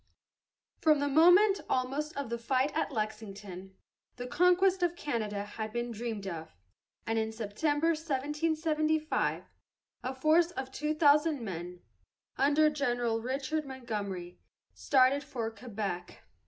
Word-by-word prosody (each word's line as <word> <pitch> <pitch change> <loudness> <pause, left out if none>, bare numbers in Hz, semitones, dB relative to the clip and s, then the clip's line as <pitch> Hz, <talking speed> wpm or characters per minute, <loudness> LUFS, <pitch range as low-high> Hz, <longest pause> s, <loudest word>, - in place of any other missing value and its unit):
From 310 -1 +4
the 285 - 0
moment, 355 +7 +6
almost, 275 +5 -1
of 280 -5 -4
the 235 - -2
fight 260 +4 0
at - - 0
Lexington, 205 -4 -5 0.4
the 245 - -6
conquest 360 +7 +3
of 345 -1 +1
Canada 215 -10 -3
had 215 +1 -6
been 240 +1 -3
dreamed 225 -3 -4
of, 160 - -6 0.5
and 225 0 0
in 220 0 -1
September, 290 +9 0
1775, 310 +1 0 0.6
a 255 +2 -4
force 315 +5 +4
of 265 -6 -6
two 300 +3 -2
thousand 300 -2 +4
men, 180 -3 -6 0.5
under 295 +3 +4
General 245 -5 0
Richard 270 +5 -2
Montgomery, 210 -10 -5 0.3
started 270 +1 +3
for 235 -5 -4
Quebec. 200 -6 -5
260 Hz, 125 wpm, -31 LUFS, 220-305 Hz, 0.6 s, moment